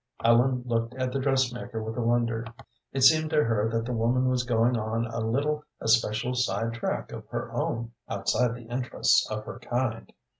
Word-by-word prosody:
Ellen 125 +2 +4
looked 115 0 -1
at 130 -1 -2
the 135 - -1
dressmaker 130 -4 -1
with 110 0 -5
wonder; 115 -1 +1 0.5
it 135 - -2
seemed 155 +4 +6
to 155 -1 +3
her 110 -1 +1
that 115 0 -1
the 125 - -3
woman 120 +3 +2
was 125 -1 +1
going 120 0 +2
on 115 +1 -1
a 115 0 -4
little 145 +7 0 0.2
especial 115 +2 +2
side 115 -2 0
track 115 - -3
of - - -8
her - - -4
own 115 0 -2 0.2
outside 115 +4 +1
the 120 -2 -11
interests 125 - +1
of - - -4
her - - -8
kind. - - -2
120 Hz, 180 wpm, -27 LUFS, 115-130 Hz, 0.5 s, seemed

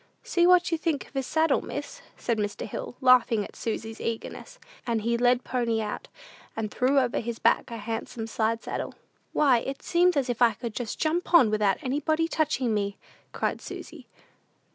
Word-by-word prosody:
"See 345 -1 +3
what 360 -1 +5
you 330 - 0
think 315 -4 -1
of - - -22
his 270 -2 -2
saddle, 320 -2 +2
miss," 290 +13 -6 0.2
said 230 -3 -1
Mr. 205 -1 -2
Hill, 225 - -6
laughing 245 -4 +5
at - - -13
Susy's 225 0 -4
eagerness; 230 - -5 0.3
and 230 -2 0
he 235 +1 +1
led 245 +1 +3
pony 235 -3 0
out, 210 -1 -4 0.5
and 215 -2 -2
threw 265 +2 +2
over 255 -3 +2
his 235 0 -4
back - - +2
a 230 - -5
handsome 225 +1 -4
side 225 0 -1
saddle. - - -4 0.4
"Why, 265 -5 +4
it 270 +3 -6
seems 355 -1 +3
as 270 -2 +1
if 245 -1 -3
I 235 -2 +6
could 230 +2 -5
just 230 -1 -4
jump 340 +3 +1
on 245 -11 +7
without 210 -3 +2
anybody 310 +5 0
touching 285 -8 0
me," 200 -1 -1 0.3
cried - - -2
Susy. - - -9
245 Hz, 185 wpm, -27 LUFS, 225-290 Hz, 0.5 s, on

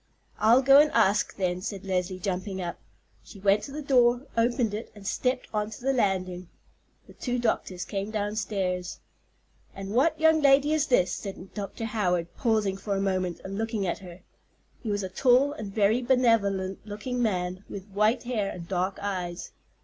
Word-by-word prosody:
"I'll 235 +5 +5
go 275 +2 +8
and 300 +1 +5
ask, 210 -2 +2
then," 180 -2 -1
said 195 0 -5
Leslie, 185 -1 -1
jumping 190 +1 -3
up. 175 -2 -4 0.4
She 200 - -13
went 200 +1 +3
to 280 - -9
the 300 +2 -5
door, 245 -2 +4
opened 235 -1 +1
it, 215 +3 -5
and 205 -1 -13
stepped 250 +5 -1
on 210 0 -1
to 220 - -9
the 270 +2 +1
landing. 185 -6 -1 0.6
The - - -15
two 250 -1 -3
doctors 195 -6 -1
came 200 +1 -3
downstairs. 205 -4 -2 0.8
"And 195 0 -6
what 310 +6 +2
young 320 0 +4
lady 285 +2 +5
is 310 -1 +1
this?" 185 -8 +3
said 195 -2 -7
Dr. 205 +2 -5
Howard, 180 -6 -1
pausing 215 -5 +1
for 200 +1 -3
a - - 0
moment 185 -3 -1
and 195 +2 -5
looking 225 -3 -1
at 175 - -2
her. 180 -2 -11 0.6
He 230 - -4
was 205 -1 -1
a - - -2
tall 255 +8 +3
and 215 -7 -7
very 215 +3 +2
benevolent 220 -7 +2
looking 220 +4 -4
man, 185 -4 -1
with 195 -2 -7
white 210 +4 +2
hair 225 -5 -1
and 170 -2 -8
dark 185 +1 -1
eyes. 180 -3 -4
205 Hz, 180 wpm, -27 LUFS, 190-240 Hz, 0.8 s, go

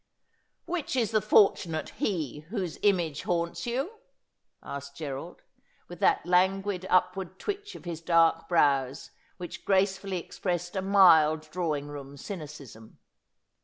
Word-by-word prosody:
' - - -44 0.2
Which 345 -6 -3
is 230 -4 +1
the 215 -1 +2
fortunate 190 -6 +3
he 155 - -2
whose 190 -7 -4
image 175 -7 +1
haunts 170 +4 -2
you 275 - -3 0.3
?' - - -37
asked 140 0 -7
Gerald, 150 +2 -6 0.4
with - - -10
that 415 -2 +3
languid 190 +1 +1
upward 185 0 +1
twitch 410 - -5
of - - -12
his 165 -2 -5
dark 165 -1 +3
brows 140 -5 +2 0.3
which 175 -1 -8
gracefully 190 -1 +1
expressed 175 0 -4
a 190 - 0
mild 165 -6 +6
drawing 155 -5 -2
room 140 -1 -9
cynicism. 145 - -9
175 Hz, 130 wpm, -28 LUFS, 155-195 Hz, 0.4 s, mild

